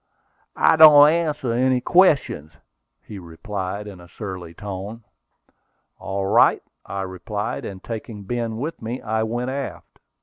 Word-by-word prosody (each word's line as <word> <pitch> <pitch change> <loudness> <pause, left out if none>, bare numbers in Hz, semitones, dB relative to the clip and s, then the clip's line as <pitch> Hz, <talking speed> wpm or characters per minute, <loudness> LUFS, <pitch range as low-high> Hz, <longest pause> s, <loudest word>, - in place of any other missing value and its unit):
"I 160 - +4
don't 150 -1 +9
answer 150 -7 -1
any 130 +1 +2
questions," 145 - +2 0.5
he 105 - -9
replied, 95 +3 -6
in 100 -4 -10
a 85 - -14
surly 90 -3 -8
tone. 100 +4 -7 1.0
"All 95 0 -3
right," 95 - +4 0.2
I 100 -1 -5
replied, 95 +3 -5
and 95 -2 -8
taking 110 -2 -7
Ben 115 +1 -3
with 150 +7 -5
me, 115 +3 -4
I 110 0 -2
went 120 +3 -2
aft. 135 0 -7
110 Hz, 135 wpm, -22 LUFS, 95-130 Hz, 1.0 s, don't